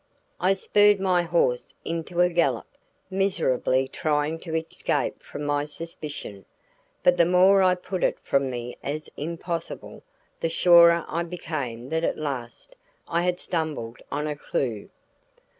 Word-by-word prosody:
I 190 Hz, +2 st, +3 dB
spurred 205 Hz, +1 st, +4 dB
my 185 Hz, -2 st, +2 dB
horse 165 Hz, -8 st, 0 dB
into 170 Hz, +1 st, -2 dB
a 180 Hz, -, +5 dB
gallop, 155 Hz, -9 st, +1 dB, 0.5 s
miserably 165 Hz, -9 st, +1 dB
trying 150 Hz, +2 st, -1 dB
to 160 Hz, -2 st, -5 dB
escape 160 Hz, 0 st, -2 dB
from 145 Hz, -, -8 dB
my 145 Hz, 0 st, 0 dB
suspicion; 150 Hz, -9 st, -7 dB, 0.6 s
but 180 Hz, 0 st, +5 dB
the 170 Hz, -, +5 dB
more 185 Hz, +2 st, +6 dB
I 185 Hz, -1 st, +4 dB
put 180 Hz, 0 st, -4 dB
it -, -, +2 dB
from 135 Hz, -1 st, +1 dB
me 120 Hz, -1 st, -5 dB
as 150 Hz, +2 st, -4 dB
impossible, 170 Hz, +2 st, -5 dB, 0.4 s
the 165 Hz, -, 0 dB
surer 170 Hz, 0 st, +6 dB
I 170 Hz, -, -1 dB
became 145 Hz, -8 st, -5 dB
that 160 Hz, +2 st, -1 dB
at -, -, 0 dB
last 130 Hz, -6 st, -6 dB, 0.3 s
I 170 Hz, -, +1 dB
had 180 Hz, 0 st, 0 dB
stumbled 155 Hz, -11 st, -3 dB
on 150 Hz, +2 st, -1 dB
a 150 Hz, -1 st, -2 dB
clue. 120 Hz, -7 st, -3 dB
165 Hz, 140 wpm, -25 LUFS, 140-175 Hz, 0.6 s, more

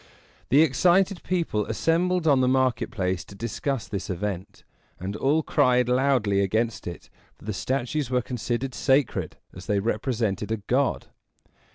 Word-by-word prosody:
The 145 Hz, +5 st, +6 dB
excited 175 Hz, +6 st, +3 dB
people 165 Hz, -, -1 dB
assembled 170 Hz, +8 st, +1 dB
on 140 Hz, -3 st, +5 dB
the 130 Hz, -, +3 dB
market 130 Hz, -3 st, +1 dB
place 90 Hz, -2 st, -2 dB
to 100 Hz, -, -13 dB
discuss 115 Hz, +2 st, -3 dB
this 100 Hz, -3 st, -5 dB
event; 95 Hz, 0 st, -4 dB, 0.4 s
and 95 Hz, +3 st, -4 dB
all 150 Hz, +6 st, +1 dB
cried 125 Hz, -5 st, +3 dB
loudly 125 Hz, -6 st, +2 dB
against 110 Hz, +3 st, -1 dB
it, 85 Hz, -2 st, -8 dB, 0.2 s
for -, -, -17 dB
the 110 Hz, -, -2 dB
statues 130 Hz, +5 st, -2 dB
were 125 Hz, -1 st, +1 dB
considered 125 Hz, +2 st, -3 dB
sacred, 135 Hz, -2 st, +1 dB, 0.2 s
as 90 Hz, -, -11 dB
they 105 Hz, -, +1 dB
represented 110 Hz, -1 st, -1 dB
a 110 Hz, -, 0 dB
god. 125 Hz, +6 st, -1 dB
125 Hz, 150 wpm, -25 LUFS, 105-140 Hz, 0.4 s, The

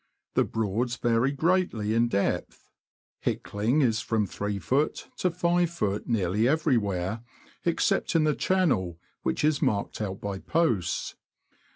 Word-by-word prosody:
— -, -, -58 dB
The -, -, +4 dB
Broads 115 Hz, +3 st, -1 dB
vary 120 Hz, +3 st, +2 dB
greatly 145 Hz, -, +1 dB
in 115 Hz, +1 st, +3 dB
depth. 100 Hz, -3 st, -2 dB, 0.6 s
Hickling 115 Hz, +9 st, 0 dB
is 115 Hz, -2 st, +2 dB
from 110 Hz, -3 st, 0 dB
3ft. 105 Hz, +9 st, -1 dB
to 180 Hz, -, +1 dB
5ft. 170 Hz, -, 0 dB
nearly 105 Hz, 0 st, +1 dB
everywhere 115 Hz, -, +1 dB, 0.4 s
except -, -, +1 dB
in 165 Hz, -, +5 dB
the 155 Hz, -1 st, +3 dB
channel, 135 Hz, -, +1 dB, 0.2 s
which 65 Hz, -, -1 dB
is 150 Hz, -1 st, +2 dB
marked 110 Hz, -7 st, 0 dB
out 95 Hz, -2 st, -3 dB
by 100 Hz, -1 st, -4 dB
posts. 120 Hz, -, 0 dB
115 Hz, 130 wpm, -27 LUFS, 100-155 Hz, 0.6 s, in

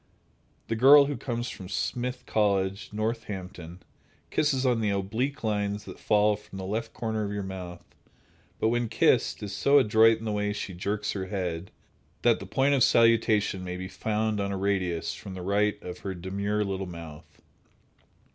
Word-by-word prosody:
The 115 Hz, -, -1 dB
girl 140 Hz, +5 st, +8 dB
who 145 Hz, 0 st, -2 dB
comes 120 Hz, -1 st, -3 dB
from 95 Hz, -1 st, -9 dB
Smith 125 Hz, +6 st, -2 dB
College, 100 Hz, -3 st, 0 dB
Northampton, 95 Hz, -6 st, -5 dB, 0.5 s
kisses 135 Hz, -3 st, +1 dB
on 120 Hz, -3 st, +2 dB
the 105 Hz, -, +1 dB
oblique 110 Hz, +9 st, -2 dB
lines 105 Hz, -1 st, -1 dB
that -, -, -10 dB
fall 105 Hz, 0 st, +3 dB
from 100 Hz, -2 st, -12 dB
the 95 Hz, -, -5 dB
left 110 Hz, +4 st, -3 dB
corner 110 Hz, -2 st, -2 dB
of 100 Hz, -, -3 dB
your 105 Hz, -1 st, -3 dB
mouth, 90 Hz, -2 st, -7 dB, 0.7 s
but 110 Hz, -, +1 dB
when 120 Hz, 0 st, 0 dB
kissed, -, -, +2 dB
is 100 Hz, -1 st, -5 dB
so 140 Hz, +5 st, +4 dB
adroit 110 Hz, -2 st, +5 dB
in 110 Hz, -, -9 dB
the 110 Hz, -, -1 dB
way 105 Hz, 0 st, -1 dB
she 100 Hz, -2 st, -5 dB
jerks 100 Hz, +4 st, -2 dB
her 95 Hz, -2 st, -4 dB
head, 90 Hz, -3 st, -3 dB, 0.5 s
that -, -, +4 dB
the -, -, -8 dB
point 135 Hz, +2 st, +2 dB
of 135 Hz, -, +2 dB
salutation 110 Hz, -4 st, +3 dB
may 90 Hz, 0 st, -5 dB
be 95 Hz, 0 st, -5 dB
found 110 Hz, +1 st, -1 dB
on 100 Hz, 0 st, -1 dB
a 100 Hz, -, -2 dB
radius 95 Hz, -4 st, -1 dB
from 95 Hz, -, -9 dB
the 90 Hz, -, -6 dB
right 100 Hz, +2 st, +1 dB
of 90 Hz, 0 st, -7 dB
her 95 Hz, -1 st, -5 dB
demure 100 Hz, +4 st, -2 dB
little 95 Hz, -1 st, -3 dB
mouth. 85 Hz, -3 st, -10 dB
105 Hz, 175 wpm, -27 LUFS, 95-115 Hz, 0.7 s, girl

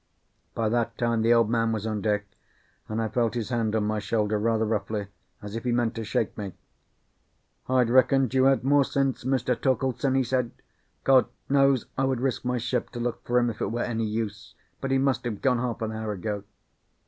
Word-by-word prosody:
By 115 Hz, -, 0 dB
that 115 Hz, 0 st, 0 dB
time 115 Hz, -1 st, +1 dB
the 115 Hz, +1 st, +3 dB
Old 115 Hz, -2 st, +5 dB
Man 115 Hz, 0 st, +1 dB
was 110 Hz, -1 st, -2 dB
on 110 Hz, -2 st, -2 dB
deck, 105 Hz, -1 st, 0 dB, 0.6 s
and 110 Hz, +1 st, -2 dB
I 110 Hz, -, 0 dB
felt 115 Hz, +1 st, 0 dB
his 115 Hz, -2 st, -2 dB
hand 115 Hz, -3 st, 0 dB
on 110 Hz, -, +1 dB
my 105 Hz, 0 st, 0 dB
shoulder 105 Hz, 0 st, 0 dB
rather 110 Hz, 0 st, +1 dB
roughly, 105 Hz, -1 st, -2 dB, 0.3 s
as 105 Hz, +1 st, -6 dB
if 115 Hz, -, -4 dB
he 125 Hz, -, 0 dB
meant 120 Hz, -1 st, +1 dB
to 115 Hz, -, -4 dB
shake 110 Hz, 0 st, -1 dB
me. 100 Hz, -3 st, -5 dB, 1.2 s
"I'd 130 Hz, -2 st, +3 dB
reckoned 130 Hz, 0 st, +4 dB
you 130 Hz, 0 st, +4 dB
had 135 Hz, -1 st, +4 dB
more 140 Hz, +1 st, +4 dB
sense, 135 Hz, -1 st, -1 dB
Mr. 130 Hz, -2 st, +1 dB
Torkeldsen," 130 Hz, +1 st, 0 dB
he 135 Hz, -, +3 dB
said. 125 Hz, -1 st, 0 dB, 0.5 s
"God 130 Hz, -1 st, +5 dB, 0.2 s
knows 135 Hz, -3 st, +4 dB
I 135 Hz, -, +3 dB
would 130 Hz, -2 st, 0 dB
risk 130 Hz, 0 st, -1 dB
my 125 Hz, 0 st, 0 dB
ship 120 Hz, 0 st, -2 dB
to 120 Hz, -, -5 dB
look 120 Hz, 0 st, -3 dB
for 120 Hz, -, +1 dB
him, 120 Hz, -1 st, +3 dB
if 110 Hz, -, -11 dB
it -, -, +1 dB
were 120 Hz, +2 st, -1 dB
any 115 Hz, -2 st, -1 dB
use; 105 Hz, -1 st, -4 dB, 0.2 s
but 135 Hz, -, -3 dB
he 135 Hz, -, +3 dB
must 135 Hz, -3 st, +1 dB
have 110 Hz, -4 st, -3 dB
gone 125 Hz, -3 st, +2 dB
half 120 Hz, -2 st, -2 dB
an 110 Hz, -, -2 dB
hour 110 Hz, -1 st, -3 dB
ago." 100 Hz, +1 st, -4 dB
115 Hz, 215 wpm, -26 LUFS, 110-130 Hz, 1.2 s, Old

